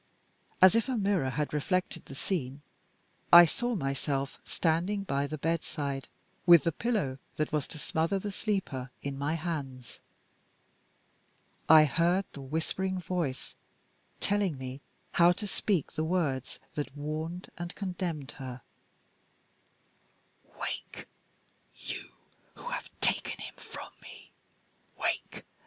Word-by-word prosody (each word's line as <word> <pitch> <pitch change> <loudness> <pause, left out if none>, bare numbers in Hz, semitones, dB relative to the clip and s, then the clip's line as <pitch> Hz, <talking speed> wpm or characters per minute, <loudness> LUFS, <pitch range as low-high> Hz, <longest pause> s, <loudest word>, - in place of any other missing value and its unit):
As 185 - +10
if 230 +3 +2
a 255 - +1
mirror 195 -10 +2
had 150 +4 -2
reflected 180 +2 0
the 135 - -9
scene, 140 -4 -3 0.7
I 175 0 +12
saw 240 - -1
myself 135 -3 -2
standing 180 +5 0
by 140 -6 0
the 155 - -4
bedside, 145 -4 -2 0.4
with 170 -4 +9
the 165 - +2
pillow 165 - -1 0.2
that 155 - -1
was 150 -2 0
to - - -7
smother 165 +5 0
the 205 +2 -3
sleeper 185 - -2
in 140 -1 -3
my 145 +3 -1
hands. 145 -7 -5 1.7
I 155 -1 +10
heard 170 +7 +2
the 140 - -7
whispering 165 +7 -1
voice 170 -7 -2 0.7
telling 200 -7 +1
me 130 +1 -6 0.3
how 175 +1 +6
to 210 - -3
speak 195 -4 0
the 155 - -2
words 155 -7 0 0.2
that 145 -1 -4
warned 155 +4 -4
and 175 0 -6
condemned 175 -7 -3
her: 130 -2 -7 2.0
"Wake! - - -5 0.7
you - - -6 0.5
who - - -7
have - - -4
taken - - +2
him - - -7
from - - -9
me! - - -13 0.7
Wake! - - -2
160 Hz, 125 wpm, -30 LUFS, 140-185 Hz, 2.0 s, I